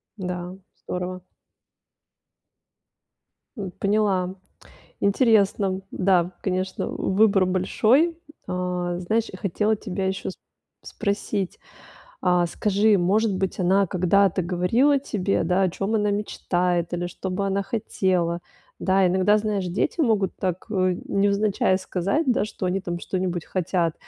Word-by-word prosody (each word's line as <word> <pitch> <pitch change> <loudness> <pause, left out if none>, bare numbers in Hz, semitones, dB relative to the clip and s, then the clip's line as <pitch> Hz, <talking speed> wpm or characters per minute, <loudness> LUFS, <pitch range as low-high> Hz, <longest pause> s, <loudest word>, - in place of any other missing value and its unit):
Да, 180 -2 -5 0.3
здорово. 180 0 -4 2.4
М, 190 -3 -5
поняла. 195 -3 +1 0.7
Интересно. 200 -3 +2
Да, 180 -1 +2
конечно, 185 0 -2
выбор 195 -1 +2
большой. 225 - +2 0.3
Э, 180 -1 -2
знаешь, 220 +6 0
я 185 - -8
хотела 210 +4 0
тебя 195 -2 -3
ещё 190 0 -2
с - - -9 0.5
спросить. 200 -1 -3 0.6
Э, 180 -1 +3
скажи, 210 +2 +2
может 200 +4 +2
быть, 190 0 -2
она 190 +2 +3
когда-то 185 +1 +2
говорила 210 - +2
тебе, 200 -9 -1
да, 180 +3 +2
о 185 - +2
чём 195 +5 -2
она 210 -1 +1
мечтает, 180 -4 -1
или 175 0 -2
что 185 +1 -6
бы 195 +2 -1
она 195 0 0
хотела? 185 -5 -1 0.4
Да, 190 0 +3
иногда, 190 +3 +3
знаешь, 205 -3 -1
дети 180 - -1
могут 220 -9 +2
так, 185 -1 -3
э, 185 -3 +1
невзначай 200 -1 +2
сказать, 195 - -1
да, - - +1
что 205 - -6
они 185 +2 0
там 175 -2 -4
что-нибудь 180 -2 -3
хотят. 175 -2 0
190 Hz, 125 wpm, -24 LUFS, 180-205 Hz, 2.4 s, Э